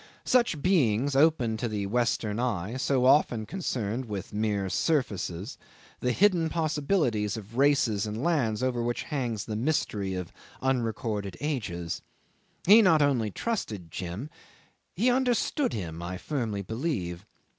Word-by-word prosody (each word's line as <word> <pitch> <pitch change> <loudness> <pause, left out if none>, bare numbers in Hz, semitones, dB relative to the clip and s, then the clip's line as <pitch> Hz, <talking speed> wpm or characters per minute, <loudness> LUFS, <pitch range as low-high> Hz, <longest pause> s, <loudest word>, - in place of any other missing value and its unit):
Such 235 - +2
beings 140 - +2
open 135 -7 +3
to 120 +2 -2
the 105 -3 -2
Western 115 -1 0
eye, 115 -3 -1
so 130 -1 +1
often 125 -5 +4
concerned 125 - -3
with 105 -4 -6
mere 105 -2 0
surfaces, 100 - -1 0.4
the 125 - 0
hidden 175 - +3
possibilities 150 - 0
of 110 +1 -10
races 130 -7 +3
and 110 +4 -4
lands 125 -10 +1
over 125 -2 0
which 120 0 -1
hangs 120 -8 -3
the 110 - -4
mystery 105 -7 -1
of 90 -2 -5 0.3
unrecorded 110 -6 -1
ages. 95 - -3 0.6
He 210 +5 +9
not 165 -7 +5
only 125 -7 +2
trusted 105 - -4
Jim, 95 - -5 0.6
he 235 +7 +3
understood 260 +3 +1
him, 85 -8 -5
I 90 +1 -4
firmly 110 -5 -3
believe. 105 - -3
120 Hz, 135 wpm, -28 LUFS, 105-150 Hz, 0.6 s, He